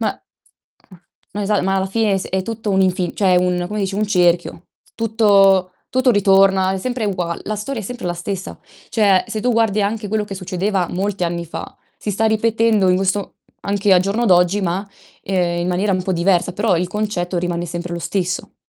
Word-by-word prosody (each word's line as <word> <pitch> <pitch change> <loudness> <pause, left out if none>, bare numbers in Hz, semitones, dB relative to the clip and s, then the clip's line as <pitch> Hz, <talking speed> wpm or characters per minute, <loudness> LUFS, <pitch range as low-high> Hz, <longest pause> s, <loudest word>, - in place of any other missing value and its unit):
Ma - - -2 1.2
ma 210 - -3
esa 205 0 +1
ma 190 +1 +1
alla 190 0 0
fine 205 0 +1
s 190 - -6
è 190 0 -1
tutto 225 0 -4
un 190 - +2
infin 185 -1 0
cioè 185 -3 +3
un 180 0 +1
come 210 +3 -4
dici, 195 -1 -2
un 210 +1 0
cerchio. 175 -3 +1 0.3
Tutto 200 -5 +3 0.2
tutto 255 0 +3
ritorna, 195 -2 +4
è 190 - -2
sempre 245 +2 -3
ugua 180 -4 -2
la 215 - -3
storia 225 +4 -4
è - - -8
sempre 245 -3 -6
la 175 - -1
stessa. 185 +2 -5 0.3
Cioè 200 -4 +3
se 215 - -4
tu 245 +3 +1
guardi 220 -2 +2
anche 210 +1 -2
quello 215 0 0
che 205 - -7
succedeva 190 0 -1
molti 195 +1 -2
anni 170 0 -2
fa, 165 - -8 0.2
si 210 - -3
sta 215 +3 +1
ripetendo 220 -2 +2
in 180 - +4
questo 195 +1 -1 0.3
anche 200 0 +1
al 180 - +6
giorno 205 +5 0
d'oggi, 180 +2 +4
ma, 190 +2 -2 0.3
ehm, 175 -2 0
in 175 - -1
maniera 190 +3 0
un 185 - 0
po' 190 +1 -2
diversa, 180 +1 +1
però 200 -1 +1
il 175 +1 -1
concetto 190 -3 -2
rimane 175 0 -2
sempre 175 +1 -5
lo 170 - -3
stesso. 180 +1 -3
195 Hz, 200 wpm, -19 LUFS, 180-210 Hz, 1.2 s, al